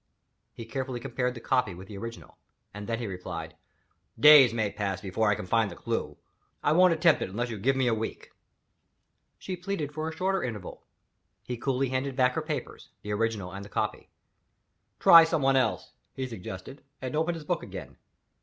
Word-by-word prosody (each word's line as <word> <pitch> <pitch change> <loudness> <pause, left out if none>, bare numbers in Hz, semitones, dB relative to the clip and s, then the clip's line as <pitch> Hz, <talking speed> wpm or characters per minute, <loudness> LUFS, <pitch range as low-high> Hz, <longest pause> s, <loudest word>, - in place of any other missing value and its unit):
He 115 - -9
carefully 130 +1 -4
compared 125 0 -2
the - - -7
copy 120 -6 0
with 95 +2 -11
the 105 - -9
original 115 +1 -9 0.3
and 105 0 -7
then 115 - -1
he 120 - -4
replied: 90 -4 -6 0.6
"Days 150 -4 +9
may 110 -3 -1
pass 100 -3 -3
before 105 +3 0
I 105 - +3
can - - -6
find 110 +2 +2
the - - -9
clew; - - -3 0.5
I 145 - +3
won't 180 +3 +6
attempt 165 -1 +4
it - - -2
unless 120 +5 -3
you 110 - -5
give 135 +6 +2
me 130 -1 +1
a 120 - +3
week." 110 0 -5 1.1
She 185 - -5
pleaded 175 -5 -4
for 155 +1 -3
a - - -6
shorter 185 +3 0
interval. 110 -7 -6 0.6
He 125 - -4
coolly 135 +2 -1
handed 130 +1 -2
back 125 -1 +3
her 160 - -1
papers; 150 -5 -5
the 105 - -3
original 105 -4 -1
and 100 +1 -7
the 100 - -11
copy. - - -3 0.9
"Try 165 0 +9
somebody 140 -5 +2
else," 125 -4 -1 0.2
he 130 - -3
suggested 115 +3 -8 0.2
and 130 +1 -4
opened 160 +2 +1
his 160 -2 -8
book - - -1
again. - - -8
Mrs. - - -23
125 Hz, 190 wpm, -28 LUFS, 105-145 Hz, 1.1 s, Days